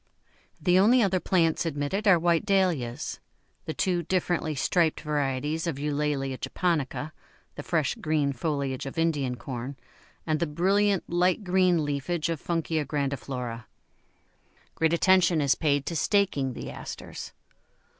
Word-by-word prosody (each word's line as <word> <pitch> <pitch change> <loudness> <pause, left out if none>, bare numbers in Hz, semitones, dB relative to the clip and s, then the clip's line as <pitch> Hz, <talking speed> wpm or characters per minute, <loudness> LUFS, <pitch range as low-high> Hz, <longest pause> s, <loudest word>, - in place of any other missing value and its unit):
The 180 0 +3
only 235 +5 +5
other 190 -2 +2
plants 170 -3 +2
admitted 165 +6 -2
are 190 -3 +7
white 170 0 +2
Dahlias, 180 - 0 0.5
the 160 - -3
two 180 -2 +1
differently 170 -2 -1
striped 160 +3 +1
varieties 150 +2 -1
of 155 -5 -2
Eulalia 145 -2 -1
japonica, 155 -4 -2 0.4
the - - -7
fresh 155 -2 0
green 150 -3 0
foliage 140 -1 -2
of 135 - -8
Indian 150 -6 0
Corn, 130 +2 -6 0.5
and 155 -1 0
the 170 - 0
brilliant 195 +5 +1
light 180 +4 +1
green 180 -3 +2
leafage 150 +4 -2
of 165 -4 -3
Funkia 165 -2 -1
grandiflora. 135 -5 -3 1.1
Great 160 0 +1
attention 180 -1 +4
is 140 -2 +3
paid 145 -3 0
to 170 - -3
staking 160 -8 +1
the - - -7
Asters. - - -8
160 Hz, 135 wpm, -27 LUFS, 140-175 Hz, 1.1 s, are